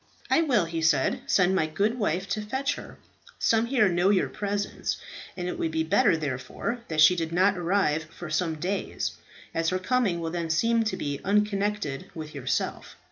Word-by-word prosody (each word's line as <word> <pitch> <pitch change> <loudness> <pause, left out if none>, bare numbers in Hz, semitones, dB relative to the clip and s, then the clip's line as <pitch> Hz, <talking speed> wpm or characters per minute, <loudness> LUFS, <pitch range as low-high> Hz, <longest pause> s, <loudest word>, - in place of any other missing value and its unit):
"I - - +5
will," 245 - +2
he 165 0 -3
said, 155 -5 +2
"send 185 -1 +3
my 170 -4 +2
good 205 +10 0
wife 190 -2 0
to 215 +2 -1
fetch 265 +6 -1
her. - - -10 0.4
Some 225 +1 +2
here 235 -5 +3
know 175 +1 +2
your 200 -2 +2
presence, 205 0 -2 0.4
and 180 -1 -3
it 180 - -4
would 165 - 0
be 160 0 0
better 175 +2 +3
therefore 145 - -3
that 155 -1 +1
she 155 +4 +7
did 165 -2 -2
not 185 +4 +3
arrive 170 -3 +1
for 165 +1 -9
some 160 0 0
days, 180 +6 -2 0.4
as 165 0 +1
her 185 - 0
coming 200 -2 +1
will 165 -1 -3
then 170 -1 -3
seem 230 +8 +2
to 190 -3 -1
be 145 -5 -3
unconnected 205 -6 0
with 155 -2 -7
yourself. 135 -3 -3
180 Hz, 190 wpm, -27 LUFS, 160-210 Hz, 0.4 s, she